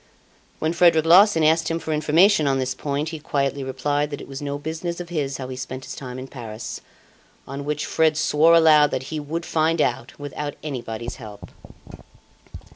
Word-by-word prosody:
When 160 +1 -1
Frederic 170 -2 +4
Larsan 175 0 +6
asked 160 +1 +3
him 165 - -1
for 160 -1 -3
information 155 +2 +4
on 135 -1 +2
this 130 0 -1
point, 145 +2 -3
he 160 -1 -6
quietly 140 -2 -1
replied 145 +3 -1
that 145 - -6
it - - -10
was 135 0 -7
no 145 0 -3
business 160 +4 -5
of 175 -1 -7
his 145 -5 -2
how 130 - -6
he 130 - -5
spent 130 0 -7
his - - -7
time 125 -2 -7
in 130 +1 -7
Paris. 115 -5 -7 0.7
On 140 +1 -6
which 150 0 -2
Fred 160 -1 +2
swore 160 +2 +4
aloud 155 -3 +6
that 130 - -3
he 155 - -2
would 160 +3 -4
find 160 +1 +1
out, 120 -3 -1
without 145 0 -5
anybody's 120 -5 -5
help. 105 -4 -11
150 Hz, 190 wpm, -23 LUFS, 135-160 Hz, 0.7 s, Larsan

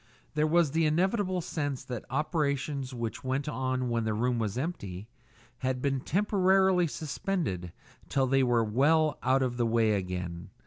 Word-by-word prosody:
There 150 0 +2
was 165 -2 +3
the 160 +1 +2
inevitable 185 +3 +1
sense 145 -5 -3
that 125 -3 -6
operations 140 -1 -1
which 115 -3 -4
went 135 +3 -1
on 130 -3 -1
when 115 -1 0
the 110 -1 -1
room 120 +2 0
was 110 -1 -2
empty 105 - -4 0.5
had 130 -1 -1
been 135 0 0
temporarily 190 +1 +3
suspended 145 - -3 0.4
till 135 -1 +2
they 135 +1 +3
were 120 -3 +3
well 145 +7 +2
out 130 +1 +3
of 120 -1 -2
the 120 -1 +1
way 115 -1 +3
again. 90 -3 -4
135 Hz, 160 wpm, -29 LUFS, 115-155 Hz, 0.5 s, was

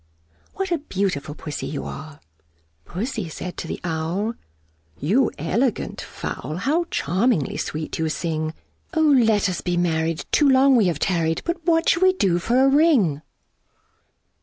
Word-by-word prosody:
What 385 -1 -3
a 340 - +1
beautiful 185 - -2
Pussy 150 -2 -5
you 145 - -4
are!" 155 -1 -8 0.7
Pussy 210 -1 -4
said 180 +3 -6
to - - -5
the - - -4
Owl, 175 +6 -2 0.7
"You 220 - +2
elegant 220 - -1
fowl! 150 +6 -6
How 305 - +1
charmingly 185 - 0
sweet 155 +1 -4
you 160 -1 0
sing! 155 -1 -2 0.4
O 320 - +3
let 235 -9 +4
us 185 -2 -3
be 175 -1 -1
married! 165 -1 0
too 295 -2 +4
long 265 0 +5
we 220 -6 +4
have 170 -4 0
tarried: 165 -1 0
But 340 0 -2
what 330 -1 +3
shall 335 - +3
we 375 0 +5
do 185 - +1
for 245 +8 +2
a - - +5
ring?" 270 - +3
185 Hz, 155 wpm, -23 LUFS, 160-270 Hz, 0.7 s, long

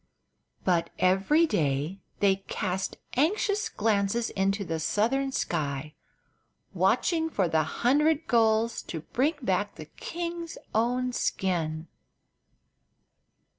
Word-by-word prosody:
But 175 -3 +2
every 195 - +4
day 155 - 0 0.2
they 195 -1 +4
cast 190 -1 -2 0.2
anxious 405 - +1
glances 215 - 0
into 195 0 0
the 165 -1 -2
southern 250 - +1
sky, 150 - -2 0.8
watching 325 -2 +2
for 195 - +1
the 160 -1 +2
hundred 290 - +2
gulls 225 -1 +2
to 160 - -6
bring 275 - 0
back 200 -1 0
the 155 - -8
king's 335 - -5 0.2
own 245 +3 +1
skin. 165 -8 -1
205 Hz, 100 wpm, -28 LUFS, 180-270 Hz, 0.8 s, every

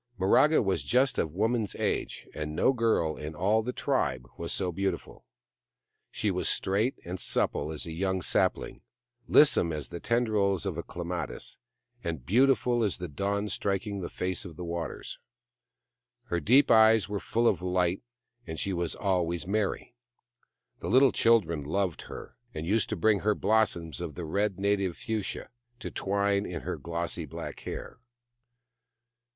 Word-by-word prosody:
Miraga 145 +12 +4
was 95 -2 0
just 130 +1 +2
of 80 0 -2
woman's 110 +1 0
age, - - -2
and 75 0 -4
no 135 - +3
girl 110 -10 +1
in 75 +1 -7
all 105 +7 +2
the 125 +3 -3
tribe 75 - -1
was 85 - -4
so 95 -2 -1
beautiful. 95 +3 -4 0.8
She - - -1
was - - -1
straight 105 +7 +1
and 90 +2 -5
supple 75 -2 0
as 80 - -5
a 85 - -6
young 95 +2 -1
sapling, - - 0 0.5
lissom 85 - +5
as 75 -5 -4
the 85 - -6
tendrils 105 -5 +1
of 95 - -1
the 85 - -4
clematis, 85 -3 -5 0.4
and 80 -7 -4
beautiful 125 - +3
as 105 - 0
the 90 - -5
da\Mi 100 +7 -2
striking 100 +1 -2
on - - -5
the 85 - -4
face 90 0 -2
of 85 -4 -9
the 90 - -6
waters. 85 0 -5 1.1
Her 85 - 0
deep 125 - +5
eyes 110 -2 +6
were 100 -1 -3
full 115 +4 +1
of - - +2
light, 90 0 +1 0.5
and 80 - -5
she 100 - -1
was 85 -2 -2
always 85 -4 0
merry. 105 +4 -1 0.9
The - - -4
little 130 0 +6
children 100 -10 +3
loved 90 +3 -1
her, - - -9 0.2
and 80 - -4
used 105 +3 +1
to 110 - -1
bring 105 +3 +3
her 105 +1 +1
blossoms 95 - +1
of 75 - -5
the 85 - -5
red 100 +4 0
native 100 -3 0
fuchsia, 110 -3 -4 0.3
to - - -6
twine 100 0 0
in 85 -2 -5
her - - -4
glossy 85 0 -3
black 70 - -7
hair. - - -7
95 Hz, 160 wpm, -29 LUFS, 85-110 Hz, 1.1 s, eyes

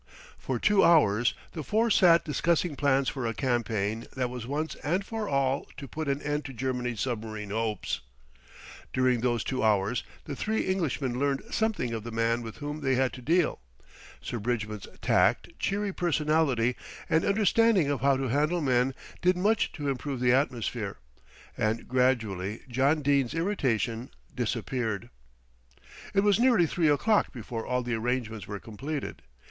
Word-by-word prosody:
For - - -2
two 205 -1 +4
hours 120 -8 +4 0.2
the 160 - -5
four 220 - +1
sat 170 -3 +5
discussing 165 +1 +1
plans 140 -1 +2
for 130 -4 -2
a 115 - -3
campaign 115 -4 -1
that 125 -2 -1
was 125 -2 -6
once 150 +4 -2
and 180 +7 -1
for 220 -1 -4
all 135 0 +1
to 140 - -7
put 155 +5 -5
an 140 +1 -1
end 150 0 -1
to 135 - -6
Germany's 125 -2 -2
submarine 110 -4 -4
hopes. 110 0 -2 0.9
During 130 -2 +2
those 120 -2 +1
two 130 -1 -2
hours 105 +1 +2 0.2
the 145 - -6
three 220 +9 -1
Englishmen 145 -9 -1
learned 140 -1 0
something 215 - 0
of 110 -2 -4
the 115 - -6
man 115 +1 0
with 115 -2 -7
whom 145 +1 -5
they 135 -2 +2
had 130 0 +1
to 125 - -8
deal. 165 +6 +2 0.6
Sir 120 - -4
Bridgman's 105 -2 -3 0.2
tact, - - +3
cheery 200 0 -1
personality 150 -8 +1 0.3
and 160 - +2
understanding 205 -5 +3
of 140 -5 -2
how 135 0 +4
to 135 -1 -2
handle 150 +7 +1
men 130 -3 +2 0.3
did 180 0 +3
much 210 +4 +2
to 145 -3 -4
improve 135 0 -2
the 125 0 +3
atmosphere, 120 -6 -1 0.6
and 110 +1 -1
gradually 115 -6 0
John 135 +5 +2
Dene's 140 -2 +2
irritation 125 - -1 0.3
disappeared. 115 -3 -2 1.0
It 195 - +5
was 205 +1 +3
nearly 235 -8 +5
three 160 0 +1
o'clock 205 +9 +2
before 115 -2 -6
all 125 0 0
the 120 0 -2
arrangements 115 -2 -2
were 100 -1 -5
completed. 135 +9 -5
130 Hz, 160 wpm, -28 LUFS, 115-155 Hz, 1.0 s, sat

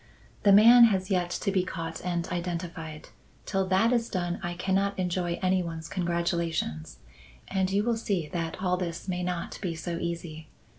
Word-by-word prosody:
"The 200 - +5
man 235 +4 +9
has 190 -3 +1
yet 180 -2 +1
to 200 +3 -1
be 190 -1 +2
caught 165 -3 -5
and 175 -1 -1
identified. 170 -3 -5 0.4
Till 195 -1 0
that 195 +6 +3
is 235 -1 +1
done 175 -3 -2
I 175 -1 -3
cannot 195 +2 0
enjoy 175 -1 -1
any 185 0 +3
one's 165 -2 -5
congratulations. 170 - -2 0.5
And 190 -1 0
you 200 +2 +1
will 235 0 +1
see 195 -8 -1
that 170 +2 -4
all 180 -1 +2
this 170 0 -4
may 180 -1 -2
not 180 -1 -3
be 175 -5 -2
so 170 +1 -4
easy. 165 -2 -5
180 Hz, 175 wpm, -28 LUFS, 170-190 Hz, 0.5 s, man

